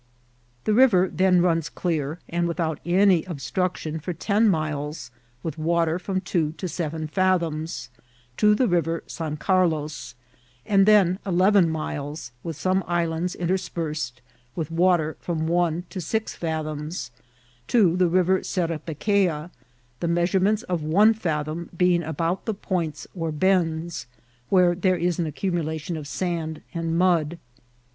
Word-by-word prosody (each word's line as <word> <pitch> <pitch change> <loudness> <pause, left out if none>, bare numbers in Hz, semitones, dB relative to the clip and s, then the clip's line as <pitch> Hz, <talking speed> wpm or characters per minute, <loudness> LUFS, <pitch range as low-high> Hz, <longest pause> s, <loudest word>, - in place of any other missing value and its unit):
The 215 - +1
river 210 -7 +5
then 180 +1 +4
runs 165 -5 +1
clear, 155 +1 -2
and 170 0 0
without 165 -3 -2
any 180 -1 +4
obstruction 165 0 -3
for 180 +4 -4
ten 210 +5 +2
miles, 155 -5 -2 0.3
with 160 -1 -4
water 165 +1 +1
from 185 +1 -2
two 165 -5 -1
to 185 - -5
seven 160 -2 -3
fathoms, 165 -5 0 0.5
to 210 0 +5
the 255 +2 +2
River 165 -2 0
San 155 -2 -5
Carlos, 155 -9 0 0.5
and 195 -1 +4
then 195 -3 +5
eleven 190 -1 +4
miles, 150 -3 -4
with 165 +2 -5
some 185 +4 +1
islands 170 0 -1
interspersed, 165 -7 -3 0.3
with 160 -2 -3
water 170 -2 +2
from 160 -2 -2
one 170 0 +1
to 185 - -4
six 220 +7 -2
fathoms, 155 -3 -4 0.6
to 195 -8 +4
the 180 -1 +3
River 185 +2 +3
Serapequea, 170 0 -1 0.5
the 170 - -1
measurements 185 +5 +2
of 180 -7 -2
one 200 +9 +5
fathom 160 -5 -3
being 180 -1 +3
about 165 +3 -2
the 220 - 0
points 170 -6 -3
or 165 -3 -3
bends, 170 -2 0 0.4
where 180 -2 +5
there 185 +1 +1
is 175 0 0
an 165 - 0
accumulation 160 0 -2
of 150 -2 -6
sand 165 -2 -3
and 165 -1 -1
mud. 170 -3 +2
170 Hz, 135 wpm, -24 LUFS, 160-185 Hz, 0.6 s, river